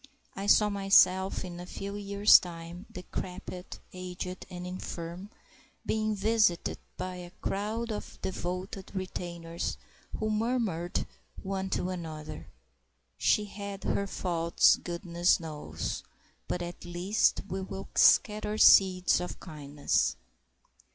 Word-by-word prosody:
I 195 +1 -4
saw 210 0 +6
myself 195 -1 +4
in 175 -1 -7
a 175 - -8
few 200 +2 -6
years' 200 0 +6
time, 170 +2 -8
decrepit, 180 0 -6 0.2
aged, 180 0 -6
and 180 0 -7
infirm, 180 +1 -6 0.6
being 215 0 0
visited 210 -3 +2 0.2
by 185 0 -4
a 175 -1 -8
crowd 220 +4 -2
of 210 - -6
devoted 185 +2 -5
retainers, 170 -3 -4 0.4
who 215 0 -1
murmured 215 -6 0 0.4
one 190 0 -2
to 185 - -2
another: 160 -4 -6 0.7
"She 210 - +3
had 200 -1 -7
her 200 - 0
faults, 170 -3 +3
goodness 175 0 +1
knows, 150 - -5 0.5
but 180 - -2
at 175 0 -7
least 175 +5 +1
we 190 0 -3
will 195 +1 -6
scatter 210 0 +4
seeds 185 -3 +6
of 180 - -5
kindness!" 145 - -1
185 Hz, 115 wpm, -30 LUFS, 175-200 Hz, 0.7 s, saw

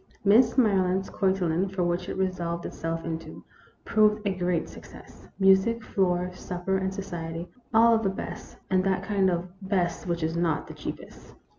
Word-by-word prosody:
Miss 230 +5 +5
Maryland's 190 -5 +2
cotillon 190 -1 +1
for 175 -2 0
such 180 +2 -7
it - - -4
resolved 175 -3 -2
itself 165 0 -4
into 165 -1 -6 0.4
proved 215 -1 +3
a 200 - +1
great 180 -2 -1
success. - - -13
Music, 195 +4 +4
floor, 180 -3 0
supper, 180 +1 -3
and 190 0 -1
society, 170 -3 -5 0.2
all 230 +1 +6
of 225 - +3
the 195 - +1
best, 190 - -7
and 185 0 +3
that 190 -1 0
kind 195 -2 +2
of 175 0 -1
" - - -34
best 180 -3 0
which 170 -1 -1
is 160 +1 -1
not 170 -3 0
the - - -10
cheapest." - - -9
185 Hz, 170 wpm, -27 LUFS, 175-195 Hz, 0.4 s, all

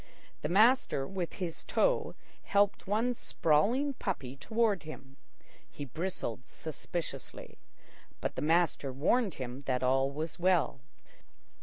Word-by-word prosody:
The 150 - -2
master 215 - +4
with 180 +1 -4
his 175 -4 -4
toe - - +1 0.3
helped 205 0 +2
one 225 +5 +2
sprawling 235 - +2
puppy 160 - -4
toward 220 +4 +1
him. 140 -3 -10 0.5
He 145 - -7
bristled 140 - -4
suspiciously, 160 -2 -6 0.6
but - - -2
the - - -4
master 160 -3 +2
warned 185 - +2
him 130 +1 -5
that 130 -1 +1
all 135 +1 +3
was 155 +4 -4
well. 175 -7 +2
165 Hz, 120 wpm, -32 LUFS, 135-205 Hz, 0.6 s, master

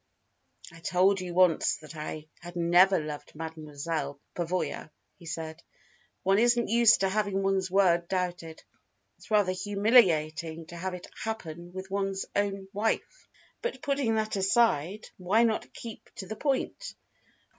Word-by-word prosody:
"I 165 - -13
told 185 +3 +2
you 175 -1 -6
once 180 -3 +4
that 155 0 -12
I 155 0 -6
had 175 +1 -10
never 175 +2 +5
loved 150 -1 -7
Mademoiselle 155 -2 -4
Pavoya," 175 -2 -2 0.3
he 170 - -12
said. 160 0 -5 0.6
"One 195 +2 +3
isn't 240 -1 +3
used 235 -1 +5
to 195 - +3
having 200 -1 0
one's 195 -1 +1
word 175 -3 +3
doubted. 175 -3 -3 0.5
It's - - -17
rather 205 -4 +3
humiliating 180 -6 +2
to 175 - -9
have 180 +2 -4
it 180 - -9 0.2
happen 175 -6 -5
with 190 +1 -8
one's 195 -1 -1
own 195 -1 -1
wife. 220 - -2 0.3
But 480 - -4
putting 275 -6 +1
that 215 -1 -1
aside, 195 -2 +2
why 200 +5 +3
not 225 -2 0
keep 230 -2 -10
to 195 - -6
the 220 - -6
point? 290 - -2
185 Hz, 145 wpm, -29 LUFS, 165-210 Hz, 0.6 s, never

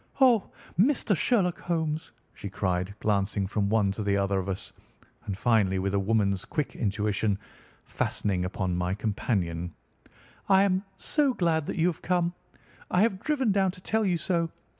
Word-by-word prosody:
"Oh, 245 -6 +5 0.3
Mr. 230 -2 +3
Sherlock 180 0 +1
Holmes!" 160 -4 -2 0.2
she 100 - -7
cried, 95 0 -1
glancing 100 -1 0
from 100 +1 -1
one 105 -2 +3
to 105 - -4
the 100 -1 +1
other 100 0 +1
of 95 +1 -4
us, 95 - -5 0.5
and 95 - -3
finally, 105 -4 +2
with 95 +1 -1
a 100 - +2
woman's 100 -2 +1
quick 150 -3 -3
intuition, 105 -1 0 0.5
fastening 95 -4 -1
upon 95 -1 -2
my 90 +1 -1
companion, 90 -6 -2 0.7
"I 195 0 +6
am 190 -1 +1
so 285 -5 +1
glad 160 -4 +1
that - - -3
you 165 - +3
have 175 -3 0
come. 175 -1 +1 0.6
I 180 +3 +3
have 200 -4 +1
driven 270 -4 +1
down 195 -1 +3
to 185 - -12
tell 220 +4 0
you 180 -4 +2
so. 170 0 0
110 Hz, 165 wpm, -28 LUFS, -, 0.7 s, I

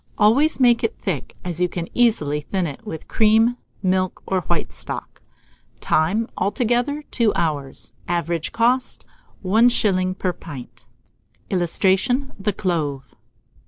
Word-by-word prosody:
Always 265 +10 +4
make 240 -1 +4
it 225 - -1
thick, 175 -9 -4
as 175 -1 -3
you 180 - +2
can 170 -1 -4
easily 150 -12 +2
thin 185 +4 -2
it 155 +8 -7
with 160 -6 -7
cream, 225 +2 +3 0.3
milk, 185 0 0
or 190 -1 0
white 170 -2 -2
stock. - - -6 0.6
Time. 195 +9 +1
Altogether, 245 +8 0
2 230 -3 +3
hours. 145 -5 -3
Average 170 -1 -1
cost, 245 +3 +1 0.4
1s. 195 -3 +3
per 185 -2 -1
pint. 140 -9 -11 0.6
[Illustration: 195 - +1
THE 210 +2 0
CLOVE. 150 - -2
190 Hz, 125 wpm, -22 LUFS, 170-230 Hz, 0.6 s, Always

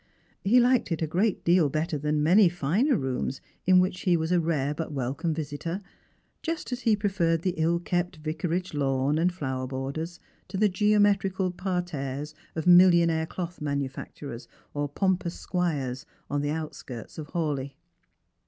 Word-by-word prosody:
He 230 +6 +5
liked 245 -4 +3
it 165 -1 0
a - - +3
great 185 +6 0
deal 170 -3 +4
better 155 +2 -1
than 150 +1 0
many 185 +4 +6
finer 180 - +1
rooms 130 -1 -2 0.3
in 185 0 +7
which 185 0 0
he 180 -3 +3
was 160 +1 -2
a 180 - +4
rare 150 -4 0
but 160 +1 -4
welcome 140 +5 -2
visitor, 155 +3 -3 0.6
just 325 -4 -3
as 250 - -2
he 225 -4 +3
preferred 180 -6 0
the 185 - +1
ill 165 +2 +2
kept 175 +1 -1
Vicarage 160 +4 -2
lawn 140 +1 +1
and 175 +2 +3
flower 130 -7 -3
borders 140 +7 -4 0.3
to - - -5
the 210 +1 +4
geometrical 195 -1 +2
parterres 155 -6 -3 0.2
of 160 - -3
millionaire 170 -3 +6
cloth 175 -1 -6
manufacturers 140 -2 -4 0.3
or 145 0 -2
pompous 180 +2 0
squires 145 -8 -2 0.2
on 145 0 +1
the 145 - -1
outskirts 150 -6 -6
of 150 - -6
Hawleigh. 140 -5 -2
165 Hz, 155 wpm, -27 LUFS, 145-185 Hz, 0.6 s, in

